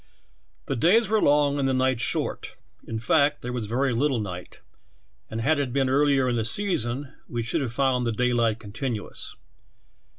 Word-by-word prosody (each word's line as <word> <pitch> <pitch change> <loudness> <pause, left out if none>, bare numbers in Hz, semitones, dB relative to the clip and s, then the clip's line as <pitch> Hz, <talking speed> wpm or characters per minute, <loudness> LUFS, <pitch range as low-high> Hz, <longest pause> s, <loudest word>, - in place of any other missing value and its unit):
"The 135 - -2
days 195 - +3
were 220 0 +2
long 145 0 +3
and 135 -1 +1
the 130 - +1
nights 130 -2 +1
short; 120 - 0 0.3
in 115 - -3
fact, 145 +5 +2
there 125 0 -4
was 120 -4 -3
very 130 +3 0
little 130 +1 +1
night, 90 -4 -7 0.7
and 110 +1 -4
had 150 +5 +2
it 135 -3 -1
been 135 0 +1
earlier 140 -1 +3
in 120 -1 0
the 115 - 0
season 130 - -1 0.2
we 120 -1 -2
should 115 - -1
have 130 -4 -2
found 125 -1 +1
the - - +1
daylight 120 -1 +1
continuous. 110 +1 -5
130 Hz, 175 wpm, -25 LUFS, 115-140 Hz, 0.7 s, days